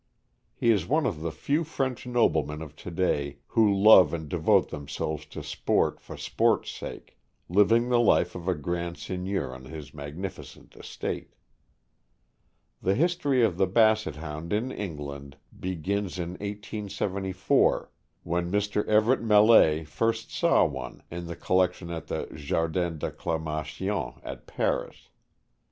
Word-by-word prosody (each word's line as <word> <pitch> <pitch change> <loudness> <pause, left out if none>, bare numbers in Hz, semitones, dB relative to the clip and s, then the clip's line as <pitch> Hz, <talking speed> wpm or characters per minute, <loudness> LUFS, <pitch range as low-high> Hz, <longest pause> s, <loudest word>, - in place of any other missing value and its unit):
He 115 - +3
is 100 -6 +1
one 155 +4 +2
of 80 -7 -2
the 85 0 -2
few 145 - 0
French 135 -6 -3
noblemen 80 - +1
of 75 -1 -11
to - - -8
day 75 -5 -1
who 110 -3 +4
love 95 -5 +7
and 80 -2 -6
devote - - +2
themselves 75 +1 -4
to - - -8
sport - - 0
for - - -10
sport's - - +1
sake, - - -9 0.3
living 110 +6 +4
the 120 -1 +4
life 90 -6 +3
of 90 0 -8
a 90 - +2
grand 85 +3 -3
seigneur 95 -6 -3
on 65 0 -10
his 75 -1 -9
magniricent 75 +6 -8
estate. - - -6 1.5
The 95 +2 +2
history 145 - +2
of 95 -6 +2
the 95 - +3
Basset 110 -3 +3
Hound 75 +1 -6
in 110 +5 0
England 70 - -6 0.2
begins 95 +2 -2
in 85 -1 -3
1874, 100 -1 -1 0.3
when 85 +1 -1
Mr. 105 +1 +1
Everett 110 +4 +3
Millais 105 -8 +6
first 115 +8 -1
saw - - +3
one - - -6
in 85 0 -5
the 85 - -5
collec 90 -1 +2
tion 85 -1 -9
at 85 -1 -6
the - - -3
Jardin 80 +3 -1
d' - - -13
Acclimation. 80 -1 -3
at - - -8
Paris. - - -2
90 Hz, 140 wpm, -27 LUFS, 80-105 Hz, 1.5 s, love